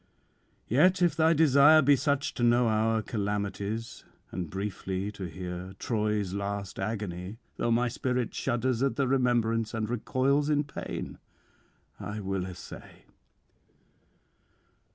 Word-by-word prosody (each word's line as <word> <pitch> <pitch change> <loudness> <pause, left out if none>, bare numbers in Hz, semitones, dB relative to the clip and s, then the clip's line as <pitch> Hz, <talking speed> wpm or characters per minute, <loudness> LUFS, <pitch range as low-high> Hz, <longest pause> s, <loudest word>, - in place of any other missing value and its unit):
Yet 180 - +4
if 175 - +3
thy 160 +1 +4
desire 155 0 +6
be 140 +1 +6
such 140 0 0
to - - -6
know 120 0 +4
our 110 0 +1
calamities, 105 +1 -3 0.3
and 85 -2 -4
briefly 95 +1 -3
to 100 -2 -7
hear 90 +1 -6
Troy's 105 -4 -1
last 100 -1 -4
agony, 95 -1 -4 0.2
though - - 0
my 120 +2 +2
spirit 125 0 -2
shudders 120 0 -1
at 135 0 +1
the 140 -2 +1
remembrance 120 -3 +1
and 110 -1 -1
recoils 130 +5 +1
in 145 -1 +2
pain, 145 - -6 0.8
I 105 +1 -5
will 95 -2 -2
essay. 90 -1 -11
115 Hz, 125 wpm, -29 LUFS, 100-130 Hz, 0.8 s, desire